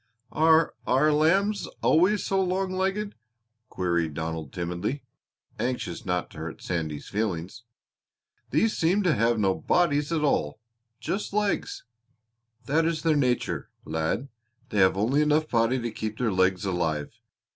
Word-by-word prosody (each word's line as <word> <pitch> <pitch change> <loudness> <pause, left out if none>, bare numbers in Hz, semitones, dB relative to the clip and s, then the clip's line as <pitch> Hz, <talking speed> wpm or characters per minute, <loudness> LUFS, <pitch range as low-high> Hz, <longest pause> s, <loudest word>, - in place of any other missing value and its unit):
"Are 160 0 +4
are 150 +4 +4
lambs 195 +7 +2 0.2
always 185 +6 +3
so 195 0 +1
long 185 +1 0
legged?" 195 +3 -1 0.6
queried 85 -4 -1
Donald 80 -3 -4
timidly, 90 +10 -3 0.6
anxious 125 -3 -3
not 90 -1 -1
to 75 - -10
hurt 80 0 -7
Sandy's 80 -4 -3
feelings. 105 +1 -3 0.8
"These 225 -1 +2
seem 185 +6 +2
to 175 -4 +3
have 115 -2 +2
no 95 -3 +2
bodies 150 - +1
at 160 -2 0
all 75 - 0 0.4
just 200 0 -3
legs." 210 -1 -1 0.8
"That 155 +6 +2
is 160 -1 -1
their 160 -2 +3
nature, 125 -4 0 0.2
lad. 80 - -2 0.4
They 105 - -1
have 95 0 +4
only 125 +9 +2
enough 150 +1 +2
body 115 +1 +2
to 120 -1 -3
keep 110 0 -5
their 120 -3 0
legs 95 0 +2
alive. 80 -5 -2
125 Hz, 140 wpm, -26 LUFS, -, 0.8 s, Are